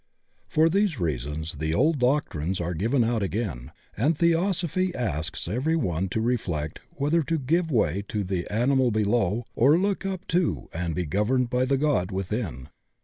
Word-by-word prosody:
For 160 Hz, +1 st, +3 dB
these 190 Hz, -, +1 dB
reasons 75 Hz, 0 st, -3 dB
the 80 Hz, +1 st, -1 dB
old 150 Hz, -, +2 dB
doctrines 95 Hz, -, 0 dB
are 85 Hz, 0 st, -2 dB
given 115 Hz, -, +1 dB
out 115 Hz, -1 st, 0 dB
again, 90 Hz, -, -3 dB, 0.2 s
and 145 Hz, +8 st, +1 dB
Theosophy 175 Hz, +1 st, +1 dB
asks 80 Hz, -, -2 dB
every 140 Hz, +9 st, 0 dB
one 95 Hz, -, -1 dB
to 110 Hz, -, -1 dB
reflect 90 Hz, -11 st, -2 dB, 0.2 s
whether 150 Hz, +4 st, +2 dB
to 165 Hz, +2 st, -1 dB
give 165 Hz, +5 st, +1 dB
way 100 Hz, -, +1 dB
to 105 Hz, -2 st, -2 dB
the 90 Hz, -2 st, -3 dB
animal 125 Hz, +4 st, +3 dB
below 110 Hz, 0 st, +1 dB
or 140 Hz, +7 st, +5 dB
look 195 Hz, +2 st, 0 dB
up 195 Hz, -1 st, -4 dB
to 175 Hz, 0 st, 0 dB
and 85 Hz, -1 st, -2 dB
be 90 Hz, -, -1 dB
governed 120 Hz, -, +1 dB
by 125 Hz, 0 st, +2 dB
the 135 Hz, +1 st, +1 dB
God 135 Hz, -11 st, +1 dB
within. 95 Hz, -, -4 dB
120 Hz, 165 wpm, -26 LUFS, -, 0.2 s, or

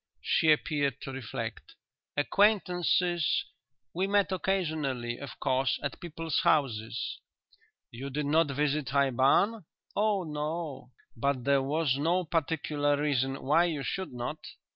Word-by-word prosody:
She 160 Hz, -, +3 dB
appeared 145 Hz, -3 st, +1 dB
to 135 Hz, -, -6 dB
reflect. 130 Hz, -4 st, -6 dB, 0.4 s
"Acquaintances.... 180 Hz, -1 st, +2 dB, 0.5 s
We 185 Hz, +3 st, 0 dB
met 200 Hz, -1 st, +2 dB
occasionally, 155 Hz, -11 st, -1 dB
of 140 Hz, -, -9 dB
course, 130 Hz, -1 st, +1 dB
at 140 Hz, -, -3 dB
people's 165 Hz, -2 st, -2 dB
houses." 120 Hz, -6 st, 0 dB, 0.7 s
"You 130 Hz, +4 st, -6 dB
did 145 Hz, +2 st, -2 dB
not 155 Hz, +3 st, +3 dB
visit 145 Hz, 0 st, 0 dB
High 140 Hz, 0 st, +2 dB
Barn?" 140 Hz, -, +3 dB, 0.3 s
"Oh 210 Hz, -2 st, +2 dB
no." 150 Hz, -3 st, -4 dB, 0.3 s
"But 140 Hz, -3 st, 0 dB
there 140 Hz, +1 st, +3 dB
was 140 Hz, 0 st, 0 dB
no 175 Hz, +5 st, +2 dB
particular 150 Hz, -3 st, 0 dB
reason 135 Hz, -2 st, 0 dB
why 155 Hz, +6 st, +4 dB
you 155 Hz, -5 st, -2 dB
should 190 Hz, +5 st, -3 dB
not?" 125 Hz, +5 st, -4 dB
150 Hz, 125 wpm, -29 LUFS, 135-170 Hz, 0.7 s, why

